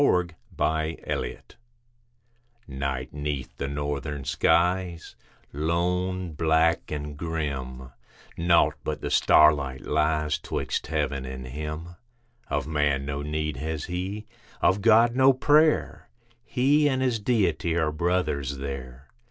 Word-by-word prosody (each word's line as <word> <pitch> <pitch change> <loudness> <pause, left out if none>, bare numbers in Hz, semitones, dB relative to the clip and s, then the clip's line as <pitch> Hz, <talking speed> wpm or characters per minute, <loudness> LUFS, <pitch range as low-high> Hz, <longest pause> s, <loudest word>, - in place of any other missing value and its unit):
THE 90 - +2 0.2
CAMPER 80 +1 -1 1.3
Night 65 -2 -4
'neath 75 -2 -4
the 70 - -3
northern 75 0 -3
skies, 90 +3 +1 0.4
lone, 90 +4 -1
black, 80 +1 +2
and 75 -1 -5
grim: 70 -5 -4 0.4
Naught 85 0 +3
but - - -3
the - - -3
starlight 70 -4 +4
lies 75 0 +1
'twixt - - -3
heaven, 70 -4 -1
and 65 0 -7
him. 75 +6 -6 0.5
Of - - -1
man 75 -3 0
no 70 0 -3
need 75 -1 -3
has 80 +1 -3
he, 95 +4 -4 0.3
of 95 +3 +2
God, 115 +2 +5
no 135 +1 +6
prayer; 150 +4 +2 0.4
He 145 +4 +3
and 130 -1 0
his 125 -4 +1
Deity 90 -8 +1
are 80 -2 +1
brothers 75 -4 -1
there. 70 -1 -7
80 Hz, 115 wpm, -26 LUFS, 70-90 Hz, 1.3 s, no